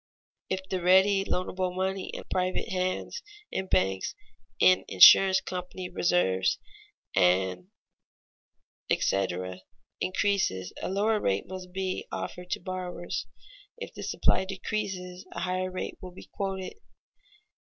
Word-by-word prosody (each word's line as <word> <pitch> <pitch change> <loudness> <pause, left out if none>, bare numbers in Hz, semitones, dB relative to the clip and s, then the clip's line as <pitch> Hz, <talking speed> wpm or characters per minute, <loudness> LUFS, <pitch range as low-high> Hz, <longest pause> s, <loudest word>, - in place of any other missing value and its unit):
If 190 0 -3
the 185 -1 -2
ready, 190 +2 +5
loanable 185 -1 -2
money 190 0 -2
in - - -6
private 185 0 0
hands, 185 - -2 0.3
in 190 - -2
banks, 95 - +1 0.4
in 185 0 +5
insurance 190 -1 +8
company 180 0 -6
reserves, 95 - +2 0.6
&c., 90 +1 +3 2.4
increases, 185 - 0
a - - -2
lower 210 +3 +2
rate 100 - 0
must 185 -1 -8
be 190 0 -3
offered 180 0 -5
to - - -1
borrowers; 180 -1 -4 0.5
if 475 - -7
the - - -8
supply - - +1
decreases, 190 -2 -4
a - - -5
higher 185 0 -1
rate 185 0 -5
will 185 - -7
be - - -12
quoted. 190 -1 -3
185 Hz, 115 wpm, -28 LUFS, 180-190 Hz, 2.4 s, insurance